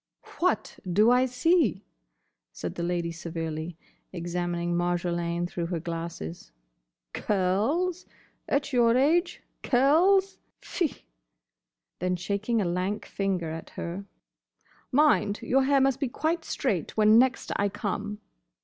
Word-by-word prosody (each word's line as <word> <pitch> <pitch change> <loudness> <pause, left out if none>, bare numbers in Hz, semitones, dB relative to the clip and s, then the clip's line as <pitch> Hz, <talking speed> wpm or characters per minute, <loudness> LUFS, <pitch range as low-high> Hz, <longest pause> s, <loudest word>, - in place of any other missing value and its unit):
"What 365 +2 0
do 210 +6 +5
I 250 +1 +4
see?" 255 - +2 0.7
said - - -5
the - - -5
Lady 170 -1 -1
severely, 165 -1 -5 0.3
examining 175 0 -2
Marjolaine 175 0 -1
through 175 -1 -3
her 170 -1 -2
glasses. 165 - -6 0.6
"Curls? 225 - 0 0.4
At 280 -1 0
your 240 -1 +4
age, 320 +7 +2 0.2
curls? 355 +10 +3 0.2
Fie!" 340 -8 -3 0.9
Then 180 +1 0
shaking 200 +6 -1
a 200 - +1
lank 180 +4 -2
finger 185 -5 -2
at 165 0 -7
her, 180 +4 -5 0.9
"Mind! 270 -7 +3
your 265 +1 +2
hair 280 0 +4
must 270 -1 +2
be 275 - 0
quite 320 +5 -1
straight 200 - -2
when 215 +1 +6
next 255 0 +1
I 200 0 +1
come." 205 +1 -4
200 Hz, 120 wpm, -27 LUFS, 175-265 Hz, 0.9 s, when